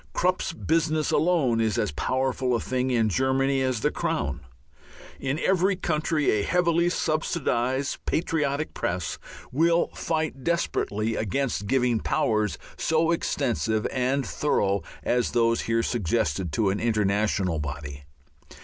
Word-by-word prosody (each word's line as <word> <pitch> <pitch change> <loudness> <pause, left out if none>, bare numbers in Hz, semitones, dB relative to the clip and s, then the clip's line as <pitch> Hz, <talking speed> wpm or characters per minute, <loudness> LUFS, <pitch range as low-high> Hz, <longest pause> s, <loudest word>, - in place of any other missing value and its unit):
Krupp's 185 +1 +1
business 160 -1 0
alone 145 -8 +2
is 110 0 +1
as 105 -9 0
powerful 130 - 0
a - - 0
thing 130 +1 -1
in 115 -3 +2
Germany 135 +4 +1
as 130 -4 0
the - - +2
Crown. - - -2 0.8
In 135 +2 -1
every 190 +3 +2
country 155 -3 0
a 105 - +1
heavily 170 - +2
subsidized 140 -6 -1
"patriotic" 155 -3 0
press 85 -3 -3 0.3
will 165 +5 +3
fight 160 -4 -3
desperately 115 -10 0
against 110 0 -1
giving 125 -2 +2
powers 105 -2 0 0.2
so 160 +1 +2
extensive 115 -9 0
and 130 +2 0
thorough 100 -9 0 0.2
as 125 0 0
those 115 -1 +2
here 115 0 0
suggested 90 - 0
to 100 +3 +2
an 100 - -2
international 100 -5 +1
body. 70 -1 -6
130 Hz, 125 wpm, -26 LUFS, 110-155 Hz, 0.8 s, will